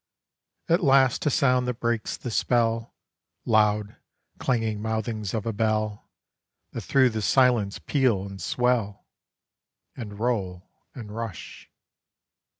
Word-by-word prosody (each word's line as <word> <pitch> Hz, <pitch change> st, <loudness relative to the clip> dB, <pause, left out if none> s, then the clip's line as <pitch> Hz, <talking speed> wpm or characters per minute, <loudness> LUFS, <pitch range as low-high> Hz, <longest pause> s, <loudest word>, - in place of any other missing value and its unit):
At 170 Hz, +2 st, +2 dB
last, 135 Hz, -1 st, +4 dB
a -, -, +5 dB
sound 125 Hz, -2 st, +2 dB
that 125 Hz, -1 st, -3 dB
breaks 115 Hz, -2 st, -1 dB
the 120 Hz, -, -6 dB
spell, 115 Hz, 0 st, 0 dB, 0.5 s
Loud, 105 Hz, -2 st, +2 dB, 0.4 s
clanging 115 Hz, -4 st, -1 dB
mouthings 110 Hz, -2 st, -3 dB
of 110 Hz, -, -3 dB
a 115 Hz, -, -2 dB
bell, 110 Hz, -1 st, -1 dB, 0.6 s
That -, -, -5 dB
through 130 Hz, -2 st, +3 dB
the 110 Hz, 0 st, -3 dB
silence 120 Hz, -4 st, +3 dB
peal 125 Hz, -9 st, +1 dB
and 100 Hz, -1 st, -9 dB
swell, 120 Hz, -5 st, 0 dB, 0.9 s
And 105 Hz, -5 st, -8 dB
roll, 95 Hz, -7 st, -2 dB, 0.2 s
and 110 Hz, -5 st, -8 dB
rush. 115 Hz, -5 st, -7 dB
115 Hz, 120 wpm, -25 LUFS, 105-125 Hz, 0.9 s, a